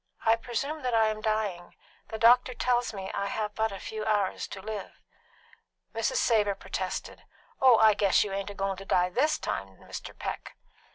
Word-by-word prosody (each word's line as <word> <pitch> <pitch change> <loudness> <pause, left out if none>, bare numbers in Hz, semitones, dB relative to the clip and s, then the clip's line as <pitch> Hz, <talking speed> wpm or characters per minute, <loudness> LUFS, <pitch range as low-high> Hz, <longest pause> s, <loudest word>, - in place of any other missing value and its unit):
"I 225 0 +6
presume 250 +7 -4
that 250 -3 0
I 220 -1 +4
am 215 0 -4
dying; 210 -5 -2 0.3
the 220 - -5
doctor 245 +3 +5
tells 245 0 +1
me 195 -3 -6
that - - -4
I 200 - -1
have 210 +1 -3
but 220 0 0
a 195 - -6
few 215 -1 -5
hours 210 -3 0
to 195 - -8
live." 205 0 -7 0.9
Mrs. 225 0 -1
Savor 210 -4 +2
protested, - - -5 0.4
"Oh, 255 -3 +7
I 220 -1 +6
guess 200 -2 +3
you 205 -2 -5
ain't 195 0 -3
a 205 - -8
goin' 195 -1 -2
to 195 - -9
die 180 -1 +2
this 295 +10 +2
time, 95 -1 -4
Mr. - - -9
Peck." - - -6
215 Hz, 190 wpm, -28 LUFS, 195-230 Hz, 0.9 s, Oh